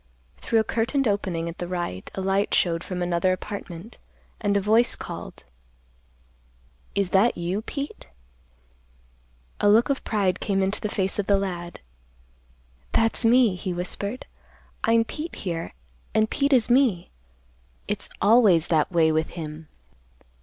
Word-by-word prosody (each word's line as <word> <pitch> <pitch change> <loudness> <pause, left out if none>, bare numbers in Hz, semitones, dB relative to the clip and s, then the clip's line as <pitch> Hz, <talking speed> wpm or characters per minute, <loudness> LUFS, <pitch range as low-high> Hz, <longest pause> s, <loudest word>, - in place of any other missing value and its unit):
Through 230 - 0
a - - +3
curtained 235 +5 0
opening 185 -5 -1
at 170 - -7
the 175 - -4
right, 175 - -4
a 190 - -3
light 195 +1 +1
showed 170 -1 +1
from 180 -1 -3
another 175 +1 +1
apartment, 195 +1 -7 0.4
and 205 -2 +1
a - - +3
voice 220 +4 +3
called, - - -8 1.5
"Is 200 -2 0
that 200 +5 +3
you, 175 +4 -2
Pete?" 280 - -6 1.5
A 205 - +4
look 225 +6 +5
of 275 - -2
pride 200 -4 0
came 195 -2 0
into 195 +2 -1
the 210 - -2
face 190 0 -1
of 200 - -1
the 200 - +4
lad, 175 -3 -5 1.1
"That's 225 +2 +2
me," 235 -2 +5
he 180 0 -4
whispered. 200 +6 -4 0.6
"I'm 230 0 +4
Pete 305 +8 -6
here, 170 -3 -4 0.4
an' 220 - +4
Pete 280 +5 0
is 245 -4 +5
me. 240 -8 +2 0.8
It's - - -4
always 205 -7 +5
that 160 0 +2
way 165 -2 +3
with 155 0 +1
him." 155 -1 -7
195 Hz, 145 wpm, -25 LUFS, 175-225 Hz, 1.5 s, look